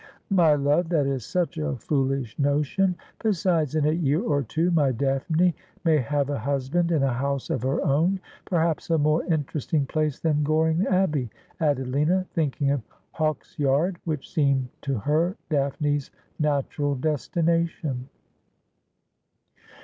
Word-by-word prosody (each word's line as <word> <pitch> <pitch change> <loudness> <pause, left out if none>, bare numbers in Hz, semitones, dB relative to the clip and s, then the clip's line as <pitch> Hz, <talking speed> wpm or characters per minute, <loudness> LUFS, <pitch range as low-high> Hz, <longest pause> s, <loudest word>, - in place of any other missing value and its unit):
' - - -34
My 170 -6 +5
love, 145 +4 +1
that 155 -5 +2
is 135 -3 -1
such 170 +4 -1
a 155 -2 -1
foolish 135 -1 -1
notion. 150 +7 +1 0.3
Besides, 170 - +1
in 155 -2 +2
a 150 - +3
year 155 -2 +1
or 145 -10 +1
two 160 +8 0
my 150 -5 +3
Daphne 140 +7 +1 0.3
may 160 -2 +4
have 140 +2 0
a 140 - -2
husband 140 +7 0
and 155 -5 +2
a 135 -2 +2
house 140 +2 -2
of - - -1
her 130 +3 0
own 165 +7 +2
— - - -25
perhaps 165 -3 0
a 165 - +3
more 155 +2 +2
interesting 150 -2 -1
place 150 0 -1
then 150 -2 +1
Goring 160 +4 +2
Abbey,' 155 -10 +1 0.3
added 145 -5 +1
Lina, 155 +8 +1
thinking 145 -3 0
of 140 -2 0 0.3
Hawksyard, 155 +2 0
which 155 -5 -3
seemed 140 -6 +2
to 140 -3 -1
her 160 - 0
Daphne's 145 0 0 0.3
natural 145 -1 0
destination. 155 -1 -1
150 Hz, 145 wpm, -25 LUFS, 140-165 Hz, 0.3 s, My